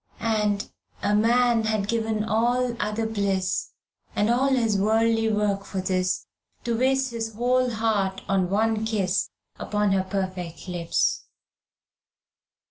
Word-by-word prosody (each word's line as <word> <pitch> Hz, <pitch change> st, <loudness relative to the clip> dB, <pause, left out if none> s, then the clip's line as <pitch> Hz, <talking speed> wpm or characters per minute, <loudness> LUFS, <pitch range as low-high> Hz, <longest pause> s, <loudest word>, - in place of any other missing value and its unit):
And 210 Hz, -2 st, 0 dB, 0.4 s
"A 205 Hz, -, +2 dB
man 230 Hz, +1 st, +3 dB
had 215 Hz, -2 st, 0 dB
given 220 Hz, -1 st, 0 dB
all 240 Hz, +3 st, +1 dB
other 210 Hz, +2 st, -1 dB
bliss 200 Hz, -4 st, -1 dB, 0.5 s
And 210 Hz, +3 st, +2 dB
all 255 Hz, +3 st, +2 dB
his 235 Hz, -6 st, +2 dB
worldly 225 Hz, +2 st, +2 dB
work 205 Hz, -2 st, 0 dB
for 195 Hz, -, -5 dB
this, 185 Hz, 0 st, 0 dB, 0.4 s
To 235 Hz, -2 st, -1 dB
waste 265 Hz, +2 st, +1 dB
his 225 Hz, -2 st, -4 dB
whole 250 Hz, +2 st, +2 dB
heart 215 Hz, -4 st, -1 dB
in 190 Hz, -2 st, +1 dB
one 220 Hz, +2 st, +1 dB
kiss 200 Hz, -4 st, 0 dB, 0.3 s
Upon 210 Hz, -1 st, 0 dB
her 195 Hz, -1 st, +3 dB
perfect 185 Hz, -3 st, -4 dB
lips." 175 Hz, -2 st, 0 dB
215 Hz, 125 wpm, -25 LUFS, 195-230 Hz, 0.5 s, man